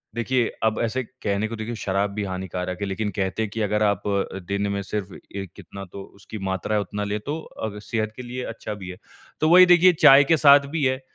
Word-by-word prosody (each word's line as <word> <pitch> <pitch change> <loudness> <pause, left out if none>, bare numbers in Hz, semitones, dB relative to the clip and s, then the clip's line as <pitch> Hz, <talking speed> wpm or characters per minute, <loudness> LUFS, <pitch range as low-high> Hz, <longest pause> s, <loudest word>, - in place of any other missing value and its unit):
देखिए, 120 0 +1 0.2
अब 110 -1 +1
ऐसे 125 +3 -1
कहने 110 -4 -3
को 115 - -6
देखिए 110 +2 -5
शराब 100 -1 -1
भी 105 0 -3
हानिकारक 90 -1 -4
है - - 0
लेक़िन 105 +2 -2
कहते 95 +2 -2
हैं 105 - -3
कि 110 - -4
अगर 105 +1 +1
आप 100 -2 0
अ, 100 -1 -1
दिन 100 +2 -2
में 100 0 -2
सिर्फ़ 100 0 -5 0.2
ए 100 -1 -3
कितना 100 0 -10
तो 100 - -8 0.2
उसकी 110 +2 -9
मात्रा 95 +3 -2
है 105 - +2
उतना 105 +1 -4
ले 105 +1 -2
तो 145 +9 -4
अ, 105 -7 -7
सेहत 110 0 -3
के 125 - -7
लिए 125 +1 -5
अच्छा 105 - -6
भी 95 -3 -8
है। 90 - -8 0.4
तो 155 - +2
वही 180 +1 +9
देखिए 175 +1 +6
चाय 145 -3 +7
के 160 +3 +3
साथ 140 -1 +6
भी 155 - 0
है 130 0 0
105 Hz, 235 wpm, -23 LUFS, 100-130 Hz, 0.4 s, वही